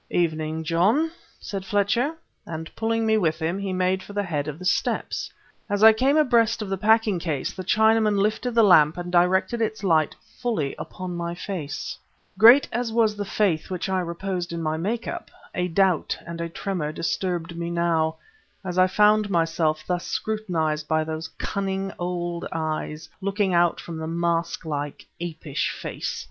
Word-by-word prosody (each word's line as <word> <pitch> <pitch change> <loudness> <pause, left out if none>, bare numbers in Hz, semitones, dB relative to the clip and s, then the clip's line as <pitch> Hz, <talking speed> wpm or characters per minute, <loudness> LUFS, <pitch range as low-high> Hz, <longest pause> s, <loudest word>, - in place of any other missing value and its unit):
"Evening, 160 -2 -1
John," 200 - +2 0.3
said 195 -2 -5
Fletcher 210 +10 +1 0.3
and, 160 0 -7
pulling 225 0 0
me 220 0 +3
with 160 -5 +1
him, 170 +4 -2
he 200 -1 -3
made 185 +1 +1
for 205 - -11
the 205 0 0
head 150 -5 -2
of 150 -1 -5
the 185 - -9
steps. 180 - 0 0.4
As 205 +1 +1
I 220 0 +10
came 265 +7 +2
abreast 235 -6 +3
of 200 - -6
the 195 - -1
packing 220 -2 +3
case, 160 -5 -2
the 185 - -6
Chinaman 220 +1 +3
lifted 215 +4 0
the 230 - +6
lamp 160 -6 +6
and 175 0 -5
directed 190 +6 +2
its 220 -1 -2
light 160 -5 +2 0.2
fully 210 - -1
upon 185 -1 -6
my 170 0 -3
face. 180 -1 -5 0.4
Great 235 +8 +8
as 240 0 -1
was 220 -2 +2
the 205 - -3
faith 190 -6 0
which 185 0 -3
I 190 -1 +1
reposed 175 0 -3
in 170 -1 -4
my 155 0 0
make 220 +8 -2
up, - - -5 0.2
a 180 0 0
doubt 185 -1 +2
and 170 0 -6
a 170 - -3
tremor 170 -3 -3
disturbed 170 +1 -2
me 170 0 -3
now, 170 -2 +1 0.5
as 180 0 -1
I 185 - +6
found 210 +2 +4
myself 165 -3 +1
thus 175 -1 -2
scrutinized 165 -8 -1
by 155 0 +2
those 160 +1 -4
cunning 195 0 -2
old 175 -1 -3
eyes 155 0 -3
looking 200 -1 0
out 175 0 +3
from 165 -2 -7
the 160 0 -4
mask 170 0 -1
like, 145 -2 -4 0.2
apish 160 -4 -3
face. - - -4
180 Hz, 175 wpm, -24 LUFS, 165-210 Hz, 0.5 s, I